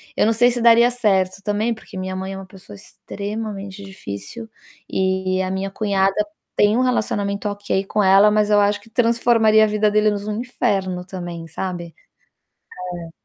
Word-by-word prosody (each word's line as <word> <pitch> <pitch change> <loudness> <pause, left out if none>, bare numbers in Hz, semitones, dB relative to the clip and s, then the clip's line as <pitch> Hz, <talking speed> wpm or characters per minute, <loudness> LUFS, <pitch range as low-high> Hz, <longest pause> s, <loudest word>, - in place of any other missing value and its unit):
eu - - +2
não 225 - +3
sei 245 +2 +4
se 240 0 -3
daria 235 +1 +6
certo 195 -6 0
também, 210 +3 0
porque 220 -3 -12
minha 185 0 -4
mãe 190 +1 -4
é 195 - -6
uma 195 - -8
pessoa 195 +1 -14
extremamente 200 -1 -7
difícil 195 - -8 0.4
e 190 0 0
a 185 0 -2
minha 190 +1 -2
cunhada 195 -1 0 0.4
tem 210 +2 +3
um 255 - +2
relacionamento 205 -5 -1
ok 205 -1 -2
com 210 +2 0
ela, 195 +2 +6
mas 210 0 +2
eu 210 -1 +5
acho 205 0 +1
que 205 - -19
transformaria 230 -2 +3
a - - 0
vida 210 0 +1
deles 210 -1 +1
num 215 +1 -3
inferno 195 -7 -2
também, 175 -3 -7
sabe. 170 0 -5 1.0
É. 170 -1 -8
205 Hz, 170 wpm, -21 LUFS, 190-220 Hz, 1.0 s, daria